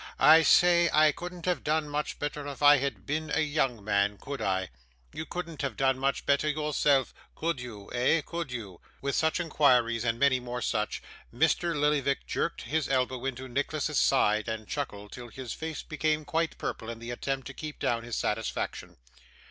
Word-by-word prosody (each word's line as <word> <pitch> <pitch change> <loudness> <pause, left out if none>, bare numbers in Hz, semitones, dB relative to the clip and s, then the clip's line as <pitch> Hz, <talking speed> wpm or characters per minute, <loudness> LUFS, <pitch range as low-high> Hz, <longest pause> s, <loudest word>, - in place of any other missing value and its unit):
I 160 +1 +8
say, 175 +1 +5
I 155 0 +5
couldn't 175 +1 -8
have 180 -1 0
done 155 0 +1
much 145 0 -3
better 145 0 -4
if 145 0 -6
I 145 0 +8
had 140 +1 -3
been 155 +1 -2
a 160 - +2
young 140 -7 0
man, 100 0 +1
could 140 +3 -6
I? 95 -2 0 0.4
You 160 - -5
couldn't 170 -4 -5
have 135 -5 -3
done 135 -1 +2
much 135 0 0
better 140 +2 +2
yourself, 150 -3 +1 0.2
could 165 -3 -1
you 110 -5 -8
eh 125 +6 +3
could 170 -5 -4
you?' 105 -8 -7 0.2
With 140 0 -2
such 160 +2 +1
inquires, 125 -8 +3
and 115 -1 0
many 130 0 +3
more 125 -1 -5
such, 105 -1 -1 0.3
Mr. 170 -4 +1
Lillyvick 145 -2 +1
jerked 170 - -2
his 155 -2 -1
elbow 130 -1 0
into 130 0 -4
Nicholas's 145 +3 -1
side, 110 -5 +3
and 110 -2 -4
chuckled 105 -8 -5
till 125 -1 -8
his 125 0 -7
face 160 -1 -5
became 155 0 -1
quite 165 0 -1
purple 115 - -4
in 115 - -5
the 115 +1 -7
attempt 135 +2 -3
to 140 - -7
keep 150 +1 -7
down 115 -1 0
his 120 -1 -5
satisfaction. 110 +1 -3
140 Hz, 185 wpm, -29 LUFS, 120-155 Hz, 0.4 s, I